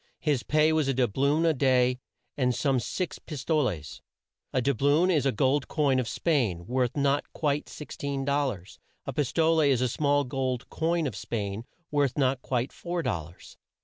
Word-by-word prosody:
His 145 -6 +1
pay 155 +6 +3
was 155 -3 +1
a 135 - +1
doub 120 -6 0
loon 145 +4 +2
a 165 - +4
day, 125 -2 +2 0.4
and 125 -3 +1
some 135 -3 +1
times 120 0 -2
six 180 +6 -3
pis 145 -6 -7
toles. 115 - -1 0.5
A - - +1
doub 130 -1 0
loon 150 +6 +4
is 150 -5 +2
a - - +3
gold 130 +5 +1
coin 140 -4 +2
of 125 - -2
Spain, 115 - 0
worth 125 +3 -1
not 140 0 +1
quite 150 -1 -1
16 140 -2 -5
dol 140 0 +1
lars. 100 -6 -7 0.3
A - - -4
pis 145 -4 -1
tole 165 0 +3
is 140 -5 +3
a 125 - +2
small 145 +3 +1
gold 130 -2 -2
coin 165 0 0
of 130 -8 -3
Spain, 105 0 -4 0.3
worth 145 -3 +1
not 130 -2 +1
quite 125 0 -2
four 175 -1 -3
dol 90 - -2
lars. 85 +3 -15
135 Hz, 195 wpm, -27 LUFS, 125-150 Hz, 0.5 s, a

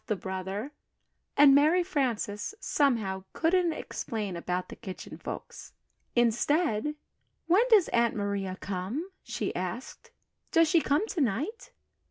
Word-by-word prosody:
laughed 210 -3 0
Brother, 190 +7 -4 0.7
and 285 -1 +8
Mary 310 +6 +5
Frances, 250 - -2
somehow, 220 -10 +1
couldn't 345 +1 +2
explain 210 - -4
about 180 +1 -3
the - - -8
Kitchen 190 -2 -8
Folks. - - -8 0.4
Instead, 245 +3 +2 0.5
"When 355 +6 +5
does 425 -7 +6
Aunt 235 -1 +2
Maria 200 -2 -2
come?" 200 - -4
she - - -4
asked. - - -5 0.4
"Does 330 0 +5
she 325 +1 +4
come 295 +9 +2
to 340 - -1
night?" 280 - -2
240 Hz, 125 wpm, -29 LUFS, 200-320 Hz, 0.7 s, and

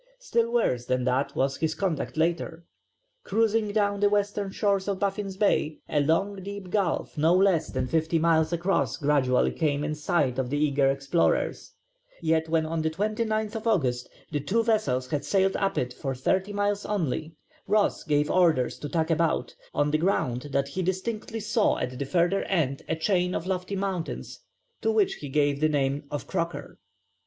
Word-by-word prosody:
Still 235 - 0
worse 125 - +1
than 125 0 0
that 130 +2 0
was 135 0 0
his 160 -1 -1
conduct 180 -5 -2
later. 165 0 -1 0.6
Cruising 220 0 +1
down 205 -1 +1
the 205 0 +4
western 205 -1 0
shores 200 0 0
of 200 -1 0
Baffin's 195 -1 -2
Bay 160 -7 +1
a 150 - +1
long 195 +7 +1
deep 195 -1 -7
gulf 195 -5 -1
no 165 +4 +4
less 185 -4 +3
than 130 -1 -2
fifty 160 +5 +1
miles 160 0 +3
across 170 - 0
gradually 140 -3 +2
came 145 -3 0
in 150 0 -1
sight 150 -4 0
of 130 -2 -1
the 145 - -1
eager 140 -2 +2
explorers, 140 +4 0 0.5
yet 160 0 +1
when 160 -1 +2
on 160 0 -2
the 160 - +1
29th 215 +4 -1
August 130 - +1 0.2
the 150 - 0
two 205 +11 +1
vessels 140 - +1
had 145 - -1
sailed 195 -1 +2
up 195 -1 0
it 125 0 -1
for 135 0 -4
thirty 190 +10 0
miles 205 0 0
only 160 -5 -2 0.3
Ross 210 +1 +2
gave 150 -1 +1
orders 165 -9 +2
to 145 - -5
tack 160 +1 0
about, 165 0 +1 0.2
on 145 0 +1
the 155 - +2
ground 140 -8 0
that 140 0 0
he 185 +6 -3
distinctly 210 +5 -3
saw 215 0 +1
at 125 0 -4
the 140 - -1
further 175 +6 +2
end 145 -8 0
a 160 - +1
chain 180 +2 +1
of 165 - -3
lofty 185 +1 -2
mountains 190 -4 -4 0.4
to 225 - +2
which 215 -3 +2
he 145 - -6
gave 145 0 +1
the 155 +1 +3
name 140 0 0
of 145 0 -4
Croker. 170 -5 -4
165 Hz, 180 wpm, -27 LUFS, 145-200 Hz, 0.6 s, the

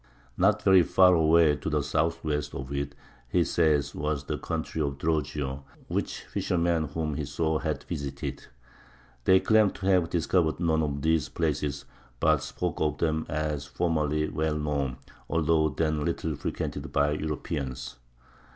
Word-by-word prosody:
Not - - +3
very 95 -1 +7
far 90 +1 +5
away 80 -2 +5
to - - -4
the - - +1
southwest 75 -2 -1
of 70 +1 -5
it, 70 0 -3 0.3
he 85 +7 +3
says, 75 -5 +2
was 75 -1 -2
the - - -4
country 80 - -3
of 70 -2 -1
Drogeo, 75 -3 -2 0.3
which - - -2
fishermen 85 -2 0
whom 75 +1 -3
he - - -3
saw 80 -1 -1
had - - -3
visited. 70 -1 -5 0.8
They 95 0 +6
claimed 110 -1 +3
to 95 - -7
have 90 -4 +3
"discovered" 85 -1 +1
none 80 -2 +2
of 70 -2 -2
these 80 -3 +2
places, 75 -3 -2 0.3
but - - +3
spoke 90 -3 -3
of 75 -1 +1
them 80 -1 0
as 75 -1 -2
formerly 75 -3 0
well 75 0 -1
known, 70 -4 -1 0.3
although 80 -1 +2
then 75 -1 0
little 80 -1 -2
frequented - - -4
by 75 0 +2
Europeans. 70 -5 -4
75 Hz, 150 wpm, -28 LUFS, 70-80 Hz, 0.8 s, very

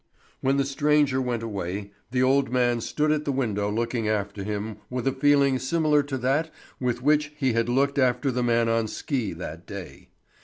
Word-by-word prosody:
When 135 +1 +1
the 140 - +2
stranger 140 -1 +2
went 120 -3 -2
away, 100 -2 -4 0.2
the 125 +1 +1
old 135 0 +3
man 120 -2 +2
stood 150 +6 0
at 155 -1 +1
the 145 - -1
window 105 -6 -1
looking 115 0 -1
after 100 -1 -2
him 105 +1 -4
with 125 0 -3
a - - +4
feeling 140 -1 +3
similar 150 +2 +2
to 140 -2 -4
that 140 +6 0 0.3
with 125 -1 -1
which 150 +1 +3
he 130 -5 +1
had 115 +1 +1
looked 140 +3 +2
after 125 +1 +2
the 125 0 -1
man 115 -1 +2
on 115 -1 +1
ski 125 - -2
that 85 0 -8
day. 100 -3 -9
125 Hz, 190 wpm, -25 LUFS, 110-140 Hz, 0.3 s, a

